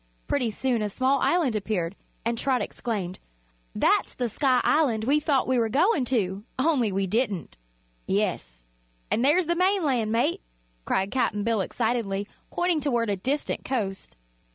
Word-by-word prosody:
Pretty 255 -5 +1
soon 240 +1 -1
a 210 - -1
small 260 +6 +1
island 310 -9 +2
appeared, 200 -4 -2 0.3
and 235 0 +1
Trot 255 +2 +1
exclaimed: 195 -6 -4 0.6
"That's - - +2
the 245 -2 -1
Sky 255 +2 +2
Island 255 -9 +2
we 280 +6 +3
thought 290 -3 +1
we 255 -1 +2
were 225 -1 +1
goin' 310 - +2
to 205 -6 -1
only 260 -6 +2
we 195 +1 0
didn't." 205 -2 -1 0.5
"Yes; - - -2 0.5
an' 230 - +2
there's 300 +7 +4
the 345 +2 +1
mainland, 325 - +1
mate!" 230 -6 +1 0.4
cried 190 +1 0
Cap'n 210 -5 0
Bill 225 -2 +1
excitedly, 215 -2 -1 0.2
pointing 350 -2 +1
toward 240 -6 0
a - - +1
distant 270 +10 -2
coast. 195 - -3
235 Hz, 155 wpm, -26 LUFS, 205-275 Hz, 0.6 s, there's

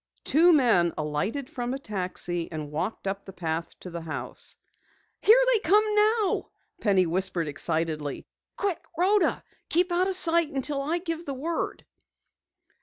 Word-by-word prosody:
Two 335 +5 +5
men 230 - +4
alighted 155 - -2
from 245 0 -4
a - - -3
taxi 180 -7 -3
and 155 -2 -6
walked 180 +9 -3
up 195 +1 -3
the 195 - -10
path 165 -1 -4
to 180 - -8
the 170 0 -5
house. 160 -1 -5 0.7
"Here 445 +5 +7
they 450 - +5
come 415 +3 +4
now!" 425 0 +2 0.3
Penny 195 -4 +3
whispered 175 -1 0
excitedly. 155 0 -2 0.3
"Quick, 390 -5 -1
Rhoda. 390 +3 +2 0.3
Keep 355 +2 +3
out 360 +2 +2
of 385 - 0
sight 335 -3 +4
until 275 0 -2
I 310 +5 0
give 335 -2 -4
the 275 - -3
word!" 325 +5 -3
250 Hz, 150 wpm, -26 LUFS, -, 0.7 s, Here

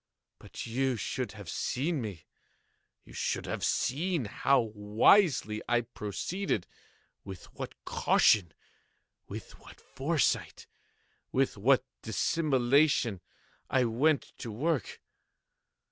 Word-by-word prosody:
But - - -8
you 130 +2 0
should 120 +1 -3
have 100 -4 -10
seen 145 - -1
me. 100 -8 -7 0.8
You - - -15
should - - -2
have - - -4
seen 155 +2 0
how 135 +6 +2
wisely 110 - +3
I 120 -1 +3
proceeded—with 105 - -6
what - - -7
caution—with 90 -8 -1
what - - -15
foresight—with 135 -2 -2
what 125 +6 +3 0.2
dissimulation 130 - +2 0.5
I 130 - +3
went 135 +6 +1
to 115 - -6
work! 145 +6 -2
125 Hz, 90 wpm, -30 LUFS, 105-145 Hz, 0.8 s, wisely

